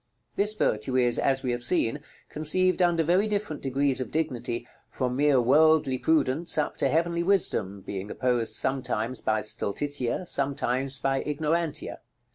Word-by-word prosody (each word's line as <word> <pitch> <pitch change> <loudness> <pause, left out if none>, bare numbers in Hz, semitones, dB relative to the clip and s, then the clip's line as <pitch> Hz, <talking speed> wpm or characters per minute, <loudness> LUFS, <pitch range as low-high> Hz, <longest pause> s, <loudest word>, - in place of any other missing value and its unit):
This 210 +1 +3
virtue 125 - -1
is, 120 -1 +2
as 135 -1 +1
we 125 - -1
have 120 0 -2
seen, 145 -3 +1 0.3
conceived 185 +4 +1
under 170 -2 +3
very 180 +6 +2
different 205 -7 -3
degrees 135 0 0
of 125 - -4
dignity, 125 -6 -3 0.2
from 125 -2 -2
mere 145 -1 +3
worldly 145 +1 +3
prudence 160 +2 +1
up 150 - 0
to - - +1
heavenly 170 +2 +1
wisdom, 170 - +1
being 100 +1 -5
opposed 125 -2 -1
sometimes 130 -3 -1
by 110 0 0
Stultitia, 125 - -2
sometimes 135 -2 -1
by 135 +1 0
Ignorantia. 155 +2 -2
135 Hz, 145 wpm, -26 LUFS, 125-160 Hz, 0.3 s, This